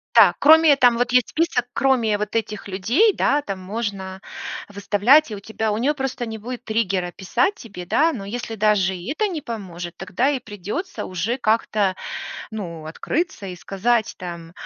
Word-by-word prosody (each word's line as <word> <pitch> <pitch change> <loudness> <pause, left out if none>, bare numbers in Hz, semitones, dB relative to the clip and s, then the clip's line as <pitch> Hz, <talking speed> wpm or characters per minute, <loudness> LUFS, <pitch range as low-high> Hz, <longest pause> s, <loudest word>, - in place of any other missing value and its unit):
Да. - - +8
Кроме 315 0 +7
там 245 -3 +5
вот 245 0 0
есть 250 -2 +4
список, 320 -7 0
кроме 235 -6 +2
вот 210 0 -4
этих 215 -2 -2
людей, 235 - +3
да, 290 +2 +2
там 195 -8 -5
можно 190 -1 -4 0.5
выставлять, 205 +8 +3
и 210 - -4
у - - -9
тебя 220 +1 -2
у 210 - -1
неё 275 +6 +1
просто 265 -3 -3
не 220 -1 -5
будет 245 +3 -7
триггера 195 -5 -1
писать 245 - 0
тебе, 195 - -10
да. 320 - +3
Но 205 -9 -6
если 225 +2 -5
даже 205 -3 +2
и 180 +10 -4
это 430 - +2
не 320 - -3
поможет, 180 -7 -6
тогда 215 +9 0
и 275 -3 -1
придется 215 - -5
уже 185 +7 -2
как-то, 215 -4 +1 0.6
ну, 170 -7 -6
открыться 235 - -3
и 180 -1 -6
сказать 220 +5 0
там: 170 -3 -7
220 Hz, 175 wpm, -22 LUFS, 190-250 Hz, 0.6 s, Да